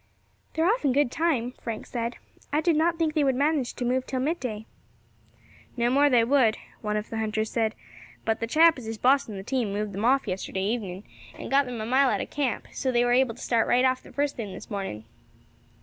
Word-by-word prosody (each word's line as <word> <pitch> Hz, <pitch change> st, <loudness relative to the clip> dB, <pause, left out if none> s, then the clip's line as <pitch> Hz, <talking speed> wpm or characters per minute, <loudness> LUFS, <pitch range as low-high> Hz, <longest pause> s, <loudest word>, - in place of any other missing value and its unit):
"They 320 Hz, -, +1 dB
are -, -, +3 dB
off 450 Hz, +6 st, +2 dB
in 275 Hz, -3 st, +2 dB
good 280 Hz, -2 st, +2 dB
time," 280 Hz, -8 st, 0 dB
Frank 225 Hz, -2 st, -5 dB
said; 235 Hz, 0 st, -3 dB, 0.4 s
"I 295 Hz, -, +2 dB
did 330 Hz, 0 st, +2 dB
not 330 Hz, +2 st, +2 dB
think 320 Hz, -2 st, 0 dB
they 305 Hz, -2 st, +2 dB
would 265 Hz, -2 st, +2 dB
manage 285 Hz, -2 st, 0 dB
to 245 Hz, -, -3 dB
move 255 Hz, +1 st, 0 dB
till 260 Hz, -, -2 dB
midday." 255 Hz, -7 st, -2 dB, 1.1 s
"No 240 Hz, 0 st, +2 dB
more 285 Hz, +2 st, +4 dB
they 245 Hz, -4 st, +4 dB
would," 235 Hz, -3 st, +3 dB, 0.2 s
one 210 Hz, -1 st, -1 dB
of 210 Hz, -, -5 dB
the 225 Hz, -, -3 dB
hunters 220 Hz, 0 st, -1 dB
said; 225 Hz, -1 st, 0 dB, 0.5 s
"but 225 Hz, 0 st, 0 dB
the 230 Hz, -, -2 dB
chap 320 Hz, +3 st, +5 dB
as 230 Hz, -, -9 dB
is 225 Hz, 0 st, -4 dB
bossing 255 Hz, -4 st, +2 dB
the 190 Hz, -, -6 dB
team 240 Hz, -2 st, -1 dB
moved 210 Hz, +1 st, -2 dB
them 200 Hz, +3 st, -4 dB
off 265 Hz, 0 st, +3 dB
yesterday 190 Hz, 0 st, -3 dB
evening, 200 Hz, -3 st, -3 dB, 0.3 s
and -, -, -7 dB
got 275 Hz, 0 st, +4 dB
them 245 Hz, -2 st, -5 dB
a -, -, -3 dB
mile 260 Hz, +3 st, +3 dB
out -, -, 0 dB
of -, -, -5 dB
camp, 280 Hz, -5 st, -1 dB
so 260 Hz, -, -1 dB
they 240 Hz, 0 st, +3 dB
were 245 Hz, -, +2 dB
able 250 Hz, -2 st, +3 dB
to -, -, -13 dB
start 230 Hz, -2 st, +1 dB
right 250 Hz, +1 st, +3 dB
off 260 Hz, 0 st, +1 dB
the -, -, -15 dB
first 285 Hz, 0 st, -1 dB
thing 210 Hz, -5 st, -5 dB
this -, -, -11 dB
morning." 190 Hz, -, -4 dB
245 Hz, 235 wpm, -26 LUFS, 220-280 Hz, 1.1 s, chap